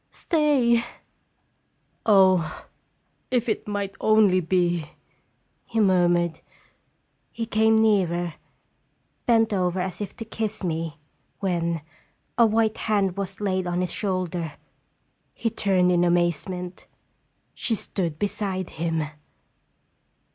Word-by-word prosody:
Stay!" 275 -8 +2 1.2
"Oh, 185 -6 +4 0.6
if 245 -1 +1
it 220 - -2
might 200 -1 -3
only 215 -4 +5
be 175 -2 0 0.4
!" - - -45
he 225 - -1
murmured. 175 -4 +3 0.9
He 230 - -4
came 220 0 +3
nearer, 180 -6 +2 0.9
bent 225 -2 +4
over 180 -1 0
as 185 +2 -3
if 205 - -5
to 225 - -6
kiss 220 -1 -4
me, 165 -2 -2 0.4
when 170 -4 -1 0.5
a 235 -1 +5
white 220 0 +1
hand 200 -4 +1
was 195 -1 -5
laid 185 -3 -1
on 175 0 0
his 180 -2 -2
shoulder. 180 -5 -2 0.8
He 230 - -1
turned 185 -4 +2
in 175 -1 +3
amazement. 175 +1 -1 0.7
She 230 - -1
stood 170 -7 -3
beside 195 -2 -2
him. 165 -1 -1
190 Hz, 110 wpm, -25 LUFS, 175-215 Hz, 1.2 s, only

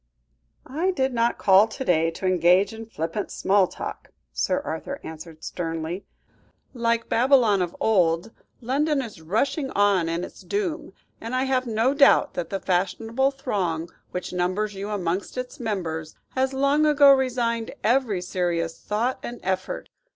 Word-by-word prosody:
"I 320 +8 -1
did 265 -7 0
not 235 0 +1
call 195 +2 +5
to 265 +4 -6
day 165 -2 +3
to 165 +3 -7
engage 185 +3 +4
in 225 0 -8
flippant 165 +1 -4
small 195 -1 +2
talk," - - -7 0.2
Sir 275 - 0
Arthur 280 - -5
answered 160 0 -10
sternly. 165 +1 -4 0.7
"Like 230 -2 0
Babylon 235 -5 +4
of 175 -1 -2
old, 180 -2 +2 0.3
London 275 +3 +1
is 215 -9 -10
rushing 265 - 0
on 200 -4 +3
its 170 +2 -4
doom, 375 -6 -3 0.3
and 230 +3 -4
I 255 - +1
have 260 -1 0
no 230 +4 +2
doubt 280 -1 +5
that 170 -2 -4
the 195 - -2
fashionable 225 +9 0
throng 190 - -2 0.2
which 180 - -5
numbers 185 +4 -1
you 200 +1 -5
amongst 190 +1 -2
its 250 0 -5
members, 165 -9 -3
has 265 0 0
long 280 +3 +2
ago 285 -2 +7
resigned 240 -3 0
every 225 -6 +2
serious 175 -3 -2
thought 235 +5 -1
and 240 -1 -7
effort. 185 0 -2
215 Hz, 150 wpm, -24 LUFS, 180-260 Hz, 0.7 s, ago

